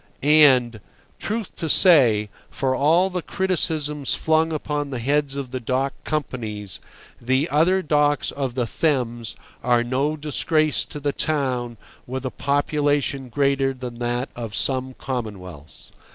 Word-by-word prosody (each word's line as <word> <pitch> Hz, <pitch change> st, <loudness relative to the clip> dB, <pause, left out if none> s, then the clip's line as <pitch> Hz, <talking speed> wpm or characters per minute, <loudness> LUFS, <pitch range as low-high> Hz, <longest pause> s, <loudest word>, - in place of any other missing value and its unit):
And, 130 Hz, -7 st, +5 dB, 0.4 s
truth 220 Hz, -1 st, -3 dB
to 160 Hz, -, -3 dB
say, 120 Hz, -, +5 dB, 0.2 s
for 130 Hz, -1 st, -1 dB
all 165 Hz, +8 st, +3 dB
the 180 Hz, -1 st, -2 dB
criticisms 155 Hz, -6 st, -1 dB
flung 160 Hz, +1 st, +1 dB
upon 150 Hz, -2 st, -3 dB
the 130 Hz, -, -4 dB
heads 140 Hz, +3 st, 0 dB
of 135 Hz, -3 st, -5 dB
the 130 Hz, -, -3 dB
dock 130 Hz, +3 st, -1 dB
companies, 110 Hz, -, -4 dB, 0.4 s
the 130 Hz, +5 st, +1 dB
other 180 Hz, +6 st, +2 dB
docks 145 Hz, -2 st, +1 dB
of 135 Hz, -4 st, -4 dB
the 125 Hz, -2 st, 0 dB
Thames 120 Hz, -3 st, -1 dB, 0.3 s
are 120 Hz, -1 st, +3 dB
no 135 Hz, +5 st, -1 dB
disgrace 155 Hz, +1 st, +1 dB
to 150 Hz, -, -8 dB
the 145 Hz, 0 st, -1 dB
town 130 Hz, -6 st, -1 dB, 0.3 s
with 130 Hz, +1 st, -5 dB
a 130 Hz, -, -2 dB
population 145 Hz, -2 st, 0 dB
greater 135 Hz, 0 st, +1 dB
than 125 Hz, -2 st, -8 dB
that 120 Hz, +2 st, -2 dB
of 115 Hz, -3 st, -6 dB
some 130 Hz, -1 st, 0 dB
commonwealths. 95 Hz, -, -7 dB
135 Hz, 140 wpm, -22 LUFS, 125-150 Hz, 0.4 s, And